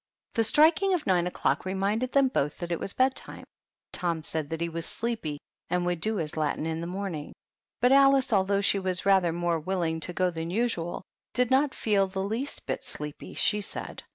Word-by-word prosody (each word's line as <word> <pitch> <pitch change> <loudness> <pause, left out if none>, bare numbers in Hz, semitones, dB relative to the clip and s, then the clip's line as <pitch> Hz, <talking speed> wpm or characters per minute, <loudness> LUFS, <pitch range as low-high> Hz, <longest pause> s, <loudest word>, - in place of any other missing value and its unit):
The 225 - +2
striking 320 - +4
of 345 - -3
nine 180 -2 +2
o'clock 180 - 0
reminded 200 +6 -1
them 275 -1 +4
both 150 - -1
that 175 -1 -5
it 170 - 0
was - - -3
bedtime. 260 +3 -1 0.5
Tom 170 -3 -1
said 155 -2 -3
that 165 0 -3
he 170 - 0
was 165 0 -4
sleepy, 220 -11 -3 0.3
and 180 0 0
would 175 -2 -1
do 220 0 0
his 160 -6 -2
Latin 155 0 -1
in 160 0 -2
the 170 - -4
morning; 180 -5 -4 0.5
but 250 +1 +5
Alice, 275 -2 +5
although 200 0 +3
she 200 0 +2
was 185 -1 -2
rather 190 -3 +4
more 170 0 0
willing 165 -1 -1
to 170 - -3
go 180 0 +1
than 165 0 -4
usual, 180 -5 -1 0.3
did 250 0 +2
not 270 +1 +3
feel 200 -3 +2
the 190 0 -3
least 225 +8 -3
bit - - -3
sleepy, 150 -1 -7
she 210 0 +2
said. - - -6
190 Hz, 200 wpm, -28 LUFS, 170-225 Hz, 0.5 s, but